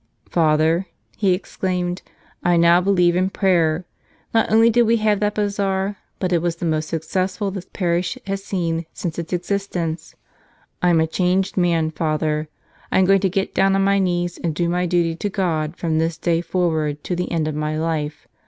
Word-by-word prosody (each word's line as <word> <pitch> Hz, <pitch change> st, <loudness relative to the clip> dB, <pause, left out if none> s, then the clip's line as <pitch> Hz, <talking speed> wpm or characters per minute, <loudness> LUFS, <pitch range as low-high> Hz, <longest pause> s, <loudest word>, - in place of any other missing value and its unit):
"Father," 160 Hz, +2 st, +2 dB, 0.3 s
he 200 Hz, -4 st, +2 dB
exclaimed, 180 Hz, -1 st, -3 dB, 0.4 s
"I 175 Hz, -1 st, +3 dB
now 170 Hz, +1 st, +5 dB
believe 180 Hz, -2 st, +3 dB
in 185 Hz, +1 st, +2 dB
prayer. 175 Hz, -4 st, +1 dB, 0.5 s
Not 225 Hz, -1 st, +2 dB
only 225 Hz, +1 st, +6 dB
did 240 Hz, +2 st, +4 dB
we 230 Hz, +1 st, +4 dB
have 215 Hz, -2 st, +2 dB
that 210 Hz, 0 st, 0 dB
bazaar, 200 Hz, -1 st, -1 dB, 0.2 s
but 185 Hz, -1 st, -1 dB
it 170 Hz, -, +2 dB
was 170 Hz, -1 st, -1 dB
the 170 Hz, -, -5 dB
most 155 Hz, -1 st, -1 dB
successful 185 Hz, +5 st, -2 dB
this 190 Hz, -1 st, -7 dB
parish 175 Hz, -1 st, -1 dB
has 195 Hz, 0 st, -3 dB
seen 170 Hz, -4 st, -2 dB
since 170 Hz, -1 st, -4 dB
its 170 Hz, -1 st, -6 dB
ex¬ 180 Hz, +2 st, -3 dB
istence. 175 Hz, -5 st, -3 dB, 0.7 s
I'm 175 Hz, -2 st, +4 dB
a 160 Hz, -, +3 dB
changed 180 Hz, +3 st, 0 dB
man, 170 Hz, -3 st, +1 dB
Father. 155 Hz, -1 st, -1 dB, 0.4 s
I'm 190 Hz, -, +4 dB
going 195 Hz, 0 st, +4 dB
to 190 Hz, -, +2 dB
get 195 Hz, +2 st, -2 dB
down 195 Hz, 0 st, +3 dB
on 195 Hz, -, +2 dB
my 200 Hz, 0 st, +3 dB
knees 175 Hz, -2 st, -1 dB
and 165 Hz, -3 st, -1 dB
do 170 Hz, +1 st, 0 dB
my 180 Hz, +1 st, 0 dB
duty 170 Hz, -1 st, +1 dB
to 205 Hz, -, -2 dB
God 170 Hz, -5 st, -1 dB
from 160 Hz, -2 st, 0 dB
this 165 Hz, 0 st, -1 dB
day 170 Hz, -1 st, +1 dB
forward 160 Hz, -4 st, -1 dB
to 180 Hz, -, -2 dB
the 180 Hz, +1 st, -3 dB
end 160 Hz, -3 st, 0 dB
of 155 Hz, -, -2 dB
my 155 Hz, +1 st, -2 dB
life. 155 Hz, -2 st, -3 dB
175 Hz, 190 wpm, -21 LUFS, 165-195 Hz, 0.7 s, only